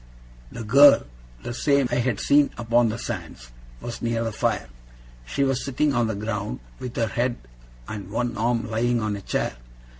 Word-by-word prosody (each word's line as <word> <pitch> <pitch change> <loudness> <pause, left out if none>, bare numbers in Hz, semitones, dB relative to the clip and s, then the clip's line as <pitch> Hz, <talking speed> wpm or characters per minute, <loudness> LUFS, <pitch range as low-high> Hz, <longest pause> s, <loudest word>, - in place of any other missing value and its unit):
The 115 - -6
girl 140 +6 +7 0.4
the - - -4
same 140 +1 +2
I - - +1
had 120 -3 0
seen 145 0 +4
upon 120 0 +2
the 110 - -3
sands 85 - -7 0.3
was 120 - -6
near 115 -1 0
the 115 - -2
fire. 110 - -1 0.6
She 140 - 0
was 135 -1 0
sitting 140 +2 0
on 120 -2 +2
the 110 - -2
ground, 105 - -3 0.2
with 125 -1 -6
her 115 - +1
head 120 +2 -1 0.5
and 100 -3 -6
one 120 +3 -2
arm 115 0 0
lying 120 +2 +1
on 110 -2 -1
a 100 - -7
chair. 60 - -2
115 Hz, 180 wpm, -24 LUFS, 110-125 Hz, 0.6 s, girl